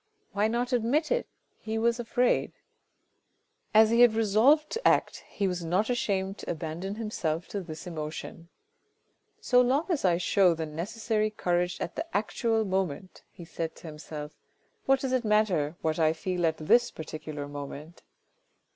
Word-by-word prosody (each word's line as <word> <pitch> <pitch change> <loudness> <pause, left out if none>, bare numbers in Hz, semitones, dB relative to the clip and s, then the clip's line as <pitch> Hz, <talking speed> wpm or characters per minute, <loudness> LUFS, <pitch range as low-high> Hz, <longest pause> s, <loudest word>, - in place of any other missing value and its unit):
Why 205 +1 +1
not 240 +3 -1
admit 245 +7 +1
it? - - 0 0.3
he 220 0 -4
was 235 +1 +1
afraid. 245 +1 +1 1.2
As 220 +1 +6
he 235 +1 +4
had 240 -3 +6
resolved 225 +8 +4
to 460 - 0
act, - - +2
he 200 - -2
was 180 -2 -3
not 185 +8 +1
ashamed 195 -4 -1
to - - -7
abandon 170 +5 -4
himself 180 -7 -3
to 200 - -3
this 160 -3 -8
emotion. 165 0 -7 0.9
"So 250 -1 +4
long 265 +6 +2
as 335 -6 0
I 175 -3 +3
show 180 -1 +3
the 160 0 -3
necessary 215 +7 -2
courage 180 -3 -1
at 170 - -4
the 330 -9 -2
actual 225 +1 0
moment," 185 -2 -3
he 170 - -11
said 165 0 -5
to - - -15
himself, 150 -1 -7 0.3
" 450 - -42
what 270 0 +4
does 265 - -2
it 255 -1 +1
matter 200 -8 +1
what 160 +1 0
I 160 -1 +3
feel 175 0 -1
at 160 - -1
this 240 +10 +3
particular 155 -2 -7
moment 145 +3 -8
195 Hz, 165 wpm, -28 LUFS, 165-230 Hz, 1.2 s, As